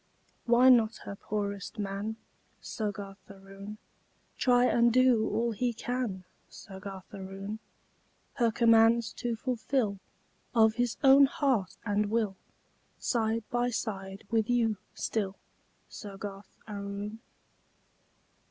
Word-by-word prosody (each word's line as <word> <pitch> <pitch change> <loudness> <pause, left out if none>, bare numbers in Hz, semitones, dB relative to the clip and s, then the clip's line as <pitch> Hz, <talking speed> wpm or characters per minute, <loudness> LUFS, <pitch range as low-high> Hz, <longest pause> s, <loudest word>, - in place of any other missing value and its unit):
Why 245 +2 +6
not 230 -3 +5
her 200 - -5
poorest 200 +1 -4
man, 205 +1 -3 0.4
Soggarth 200 -3 -5
Aroon, 195 +1 -10 0.6
Try 245 -1 +4
and 235 -1 +4
do 250 -2 +4
all 235 +1 0
he 240 +2 -1
can, 230 -5 -3 0.3
Soggarth 190 -1 -10
Aroon, 195 +2 -6 0.8
Her 235 -3 +3
commands 230 +1 +4
to 240 -1 -1
fulfill 235 -3 -1 0.6
Of 220 -1 +6
his 245 0 -1
own 275 +1 +8
heart 260 -9 0
and 205 -1 +1
will, 215 -3 0 0.6
Side 225 -1 0
by 245 0 +1
side 195 -4 -4
with 225 -1 +1
you 230 -3 +2 0.2
still, 200 -3 -2 0.5
Soggarth 200 -1 -9
Aroon? 205 +1 -5
220 Hz, 105 wpm, -30 LUFS, 200-235 Hz, 0.8 s, own